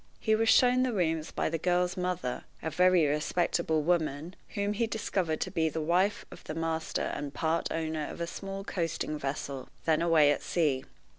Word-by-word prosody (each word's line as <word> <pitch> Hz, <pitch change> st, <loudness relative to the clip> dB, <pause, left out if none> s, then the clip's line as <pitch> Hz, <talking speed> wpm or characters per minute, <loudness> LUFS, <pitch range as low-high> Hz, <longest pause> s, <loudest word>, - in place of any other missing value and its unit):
He 220 Hz, -, +1 dB
was 225 Hz, +1 st, +3 dB
shown 250 Hz, +1 st, +5 dB
the 255 Hz, -2 st, +1 dB
rooms 160 Hz, -5 st, 0 dB
by -, -, -1 dB
the 165 Hz, -, -1 dB
girl's 180 Hz, +1 st, +1 dB
mother, 180 Hz, -8 st, -2 dB, 0.2 s
a 160 Hz, -, -2 dB
very 180 Hz, 0 st, +4 dB
respectable 155 Hz, +1 st, +1 dB
woman, 160 Hz, 0 st, 0 dB, 0.2 s
whom 205 Hz, 0 st, 0 dB
he 230 Hz, +2 st, 0 dB
discovered 185 Hz, -7 st, -1 dB
to -, -, -2 dB
be 160 Hz, -3 st, +1 dB
the 160 Hz, -, -4 dB
wife 180 Hz, +6 st, +1 dB
of -, -, -12 dB
the 155 Hz, -, -5 dB
master 165 Hz, 0 st, -2 dB
and 145 Hz, -1 st, -4 dB
part 160 Hz, +1 st, 0 dB
owner 160 Hz, -2 st, -2 dB
of -, -, -8 dB
a 170 Hz, -, -1 dB
small 195 Hz, +3 st, -6 dB
coasting 165 Hz, -5 st, -2 dB
vessel, 135 Hz, -1 st, -4 dB, 0.2 s
then 160 Hz, -1 st, +3 dB
away 160 Hz, -4 st, +5 dB
at -, -, -1 dB
sea. 145 Hz, -6 st, 0 dB
165 Hz, 190 wpm, -30 LUFS, 155-185 Hz, 0.2 s, shown